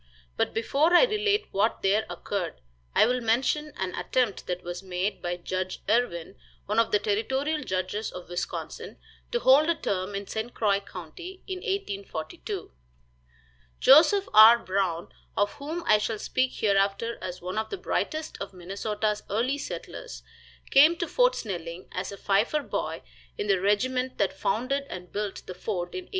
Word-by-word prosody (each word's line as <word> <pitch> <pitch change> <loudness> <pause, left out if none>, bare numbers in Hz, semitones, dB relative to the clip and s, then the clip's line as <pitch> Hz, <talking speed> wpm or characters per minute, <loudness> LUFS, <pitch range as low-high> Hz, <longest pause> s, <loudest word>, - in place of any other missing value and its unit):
But - - +1
before 285 +9 +2
I 350 - +8
relate 420 -2 +2
what 205 +4 +1
there 210 +3 +2
occurred, 185 -5 -3 0.4
I - - +7
will 250 +2 +1
mention 260 +6 +1
an 185 -1 -2
attempt 215 +4 -1
that 180 0 -3
was 175 +1 -5
made 190 +2 -2
by 175 0 -2
Judge 185 +1 -4
Irwin, 195 -6 0 0.3
one 210 +3 +1
of 230 0 +3
the 210 - +5
territorial 265 +9 0
judges 190 +1 -2
of 180 - -9
Wisconsin, 175 0 -5 0.3
to 485 - +2
hold 290 +5 +6
a 335 - +3
term 195 -7 -2
in 200 +1 -4
St. 220 +4 -5
Croix 200 -3 +2
county, 200 - -10
in 375 - -4
1842. 200 - -4 1.1
Joseph 335 +8 +6
R. 220 +2 +10
Brown, 185 -5 -1 0.3
of 205 0 +2
whom 320 +4 -4
I 215 - +5
shall 215 +1 -2
speak 255 +4 0
hereafter 200 +2 +1
as 180 0 -5
one 185 +4 -3
of 220 - -3
the 400 - -4
brightest 315 -3 -2
of 200 - -5
Minnesota's 205 +4 -2
early 245 +7 0
settlers, - - -7 0.5
came 300 +5 +7
to 345 - -2
Fort - - +3
Snelling 175 -4 -5
as 185 +2 -4
a 200 - -8
fifer 210 +11 +1
boy - - -3 0.3
in - - -2
the 195 -3 +2
regiment 250 +6 +1
that 200 - +1
founded 255 +9 -1
and 180 -1 -8
built 205 -1 -4
the 185 - -6
fort 180 -1 -4
in 370 -1 -5
1819. - - -25
210 Hz, 165 wpm, -27 LUFS, 190-270 Hz, 1.1 s, R